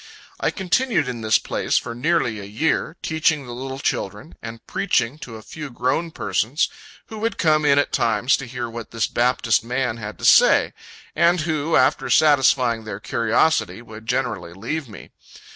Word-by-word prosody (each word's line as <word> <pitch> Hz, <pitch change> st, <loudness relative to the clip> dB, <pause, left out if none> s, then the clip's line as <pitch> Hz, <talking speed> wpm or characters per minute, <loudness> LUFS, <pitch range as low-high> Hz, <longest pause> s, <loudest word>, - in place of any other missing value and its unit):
I -, -, +1 dB
continued 210 Hz, -, 0 dB
in 120 Hz, -2 st, -5 dB
this 110 Hz, -1 st, +3 dB
place -, -, -1 dB
for 115 Hz, -, -3 dB
nearly 125 Hz, -4 st, 0 dB
a -, -, -8 dB
year, 155 Hz, -, -1 dB
teaching 160 Hz, -3 st, +1 dB
the 120 Hz, -, -8 dB
little 130 Hz, +2 st, -6 dB
children, 105 Hz, -1 st, -3 dB
and 115 Hz, 0 st, -9 dB
preaching 115 Hz, +8 st, 0 dB
to 115 Hz, -6 st, -9 dB
a 110 Hz, -, -10 dB
few 150 Hz, +3 st, -8 dB
grown 130 Hz, +7 st, -1 dB
persons, 145 Hz, -2 st, -1 dB, 0.4 s
who 220 Hz, -, -7 dB
would 225 Hz, +2 st, -2 dB
come 155 Hz, -2 st, +2 dB
in 140 Hz, -1 st, +4 dB
at 145 Hz, -, +1 dB
times 115 Hz, +2 st, +2 dB
to 135 Hz, -, -7 dB
hear 120 Hz, 0 st, -5 dB
what 115 Hz, -1 st, -8 dB
this 115 Hz, -1 st, -1 dB
Baptist 120 Hz, -2 st, +1 dB
man 125 Hz, -1 st, -2 dB
had 105 Hz, -1 st, -7 dB
to -, -, -5 dB
say; -, -, +5 dB, 0.4 s
and 175 Hz, 0 st, +3 dB
who, 155 Hz, 0 st, -1 dB
after -, -, +2 dB
satisfying 130 Hz, -6 st, +3 dB
their 105 Hz, -2 st, -6 dB
curiosity, 115 Hz, +5 st, 0 dB
would 110 Hz, -1 st, -12 dB
generally 120 Hz, -8 st, -2 dB
leave 125 Hz, -, -4 dB
me. 105 Hz, -, -12 dB
125 Hz, 175 wpm, -22 LUFS, 115-155 Hz, 0.4 s, say